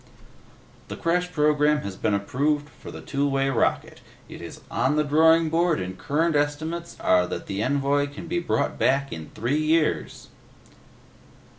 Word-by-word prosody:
"The - - -7
crash 180 +2 0
program 150 -1 +2
has 100 -1 -5
been 105 - 0
approved 145 +8 -1
for - - -13
the - - -9
two 140 0 -1
way 135 0 +1
rocket; 75 - -1 0.3
it - - -10
is - - -9
on 135 +3 +1
the 150 - +2
drawing 160 +2 +4
board 170 - +2
and 95 0 -5
current 155 - 0
estimates 155 +4 -2
are 90 -1 +3
that - - -5
the 100 +1 -3
envoy 140 +2 +1
can 145 +3 -9
be 175 +1 -1
brought 155 -4 -1
back 140 +1 +1
in 80 -1 -8
three 125 +7 0
years." 155 0 0
145 Hz, 160 wpm, -24 LUFS, 135-160 Hz, 0.3 s, drawing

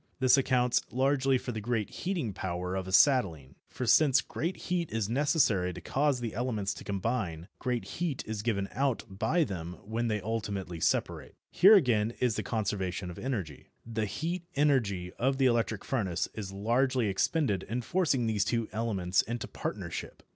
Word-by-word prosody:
This 130 -1 +6
accounts 125 -2 +2
largely 135 +1 +2
for 125 - -5
the 110 -2 -4
great 115 -1 -1
heating 170 - -3
power 90 -1 -3
of 95 -1 -3
acetylene, 95 - +3 0.2
for 125 - -4
since 140 +2 +5
great 170 +4 -3
heat 175 -2 -2
is 110 -3 -1
necessary 115 - +2
to - - -7
cause 140 -1 0
the 115 -2 -4
elements 110 -5 -1
to - - -10
combine 100 -5 -2
great 125 -2 -2
heat 165 -6 -3
is 110 -1 -4
given 100 -3 -1
out 135 0 0
by 110 - +1
them 90 - -5
when 115 +3 -2
they 105 -2 0
ultimately 100 -5 -3
separate. - - -1 0.2
Here 200 +4 +8
again 120 - +3
is 125 -4 +1
the - - -1
conservation 95 -5 -2
of 85 - -10
energy. 100 - -4 0.2
The 115 -1 -2
heat 170 - -3
energy 115 -12 +1
of 135 +2 +1
the 135 - +3
electric 115 -4 +1
furnace 95 -10 -1
is 100 -3 -6
largely 120 +5 +1
expended 100 - +1
in 120 +5 -4
forcing 150 -5 +1
these 110 -3 +1
two 115 +1 -1
elements 95 -5 +1
into 120 0 -4
partnership. - - -5
115 Hz, 170 wpm, -30 LUFS, 100-130 Hz, 0.2 s, Here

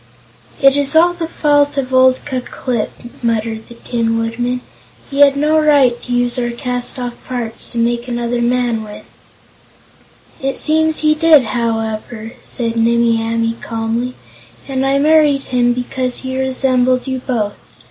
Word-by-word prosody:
"It 275 -1 +5
is 285 +1 0
all 345 +2 +5
the 340 -2 -4
fault 290 -3 +1
of 260 -1 -2
old 260 0 +4
Ku 260 -3 -2
Klip," 245 -2 -3 0.3
muttered 225 -1 -2
the 235 - -11
Tin 230 -1 -1
Woodman. 240 +2 -2 0.5
"He 280 - -3
had 280 -1 +6
no 305 +2 +3
right 280 -6 +3
to 250 - -7
use 245 0 0
our 240 -1 -1
castoff 245 0 -4
parts 240 -3 -4
to - - -5
make 235 +1 0
another 240 0 -2
man 240 -1 0
with." 210 -1 -10 1.4
"It 270 0 -1
seems 315 0 +2
he 305 0 +4
did 310 -3 +5
it, - - -7
however," 225 -1 -3
said 230 -1 -3
Nimmie 230 0 +2
Amee 230 0 -1
calmly, 230 +2 -3 0.5
"and 265 -1 -1
I 275 +1 +2
married 295 -1 +3
him 245 -1 +1
because 250 +1 -2
he 260 0 -4
resembled 255 -1 +1
you 260 -1 -3
both. 230 -5 -2
250 Hz, 155 wpm, -16 LUFS, 235-275 Hz, 1.4 s, had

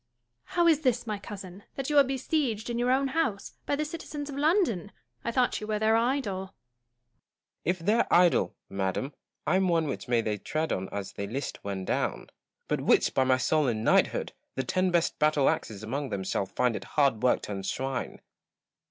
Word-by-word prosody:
] 120 0 -51
Joanna. - - -12
How 345 -1 +4
is 320 -3 +5
this, 250 -5 +1
my 210 -2 -3
cousin, 195 -2 -9
that 270 +2 -3
you 295 - +6
are - - +8
besieged 260 -4 -1
in 235 - -2
your 245 +1 +1
own 270 +1 +2
house, 260 -10 -1
by 285 - +2
the 305 +2 -1
citizens 295 -2 -6
of - - -6
London 300 - +2 0.4
1 - - -31
I 235 - 0
thought 245 -1 +1
you 210 - -5
were 215 -1 0
their 220 +1 +3
idol. 230 -5 0
Gaunt. 190 - -19 1.1
If 180 +3 +1
their 220 +4 +2
idol, 175 -1 +4
madam, 95 +8 -2 0.3
I 185 - +3
am 190 0 +2
one 165 -2 +2
which 140 - -4
they 120 -2 +2
may 105 -1 -2
tread 155 +8 -2
on 95 0 -3
as 100 -1 -5
they 100 - -4
list 135 +7 -5
when 95 -2 -4
down; - - -2 0.4
but - - 0
which, - - +3
by 130 - +3
my 130 0 +4
soul 150 +3 +2
and 110 -3 -1
knighthood - - +2
I - - -41 0.2
the 130 - -1
ten 185 +5 +1
best 170 -2 +1
battle 150 -2 +3
axes 110 -1 -1
among 135 +5 -3
them 100 -1 -3
shall 95 +1 -1
find 125 +1 0
it - - -5
hard 140 -7 +3
work 125 -1 +2
to - - -5
unshrine. 125 +7 -3
180 Hz, 215 wpm, -28 LUFS, -, 1.1 s, are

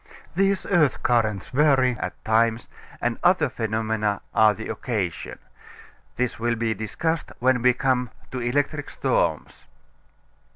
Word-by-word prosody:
These 195 +1 +1
earth 155 -8 +2
currents 110 -5 +1
vary 135 -2 +3
at - - -6
times, 115 +1 +2 0.3
and 120 -1 -1
other 175 -5 +4
phenomena 110 -3 -1
are 110 -1 +5
the 110 - -7
occasion. 95 - -3 0.8
This 125 -2 -2
will 120 +1 0
be 115 -1 0
discussed 160 +10 -3
when 125 0 +2
we 125 +1 +5
come 125 -1 0 0.2
to 130 - -4
electric 145 +4 -1
storms. - - -1
120 Hz, 125 wpm, -24 LUFS, 110-140 Hz, 0.8 s, are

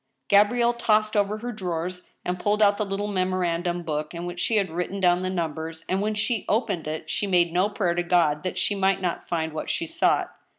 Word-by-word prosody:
Gabrielle 235 +4 +4
tossed 215 -2 +2
over 205 +1 +1
her 240 +3 -5
drawers 180 -3 -4 0.2
and 180 0 -2
pulled 205 +3 +1
out 205 -1 +4
the - - +2
little 195 +1 -2
memo 185 -2 0
randum 175 0 -1
book 155 +1 -3
in 170 +1 -5
which 175 0 -6
she 225 - +1
had 195 -4 +1
written 180 +4 -3
down 180 -1 +3
the 185 - -1
numbers, 160 -2 -4
and 190 +1 0
when 215 +1 -1
she 220 +1 0
opened 210 -8 0
it 155 +1 -4
she 205 - -1
made 175 -3 +3
no 185 +4 +2
prayer 195 -4 0
to 175 - 0
God 170 -4 +2
that 185 - -4
she - - +1
might 195 -1 +2
not 180 -2 -3
find 160 -2 -1
what 155 - -4
she 335 - -1
sought. 330 0 +1
185 Hz, 225 wpm, -25 LUFS, 175-210 Hz, 0.2 s, Gabrielle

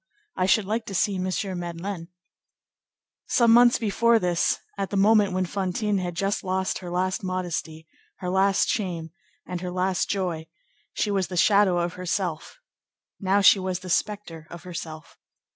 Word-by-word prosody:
I 185 - +1
should 200 +1 +3
like 220 +3 -2
to 195 - -5
see 195 +3 +1
M. 185 0 -2
Madeleine." 170 +1 -5 1.2
Some 235 -2 +4
months 240 0 +6
before 230 +2 +3
this, 180 -5 +1 0.2
at 195 -1 -3
the 200 - -2
moment 205 0 +4
when 185 0 0
Fantine 195 +2 -1
had 175 -2 -4
just 195 +3 -1
lost 190 0 -1
her 180 - -8
last 185 +2 -1
modesty, 175 -3 -4 0.3
her 180 -1 -4
last 195 +1 +3
shame, 170 -6 -2 0.3
and 180 -1 -5
her 180 - -4
last 185 +1 -1
joy, 175 -5 -2 0.5
she 210 - -1
was 195 -2 0
the 180 - -5
shadow 200 0 +4
of 175 0 -1
herself; 180 - -3 0.6
now 195 0 +2
she 195 - +7
was 185 -1 -3
the 185 -1 -6
spectre 175 -6 -2
of 175 - -10
herself. 165 -3 -8
185 Hz, 160 wpm, -25 LUFS, 175-200 Hz, 1.2 s, she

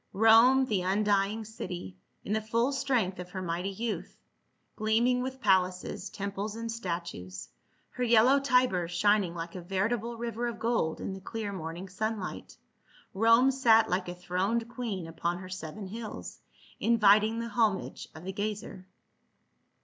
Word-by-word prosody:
Rome, 225 +5 +6
the 210 -7 0
undying 205 +3 +1
city, 180 - -7 0.3
in 210 - -1
the 220 - +1
full 230 +4 +1
strength 250 -9 0
of 180 0 -7
her 185 +1 -5
mighty 175 +2 -2
youth, 220 +3 -4 0.6
gleaming 235 +3 +2
with 260 +1 -4
palaces, 190 -1 +1
temples 200 +1 -4
and 230 0 -4
statues, 170 - -5 0.4
her 250 - -3
yellow 240 +4 +5
Tiber 250 -10 +2
shining 190 0 +2
like 170 0 -5
a 185 - -6
veritable 215 +6 -1
river 235 0 -3
of 235 -1 -4
gold 225 -8 0
in 195 - -4
the 190 - -8
clear 210 0 -5
morning 170 +1 -6
sunlight, 210 +1 -4 0.6
Rome 230 +6 +5
sat 230 -6 +4
like 180 0 0
a 175 - -5
throned 185 +6 -1
queen 225 -8 -4
upon 170 +2 -2
her 185 0 -9
seven 185 +2 -6
hills, 220 +3 -7 0.4
inviting 215 -1 +4
the 230 0 -3
homage 215 -4 0
of 160 - -10
the 190 +1 -5
gazer. 205 -2 -5
210 Hz, 150 wpm, -29 LUFS, 185-230 Hz, 0.6 s, Rome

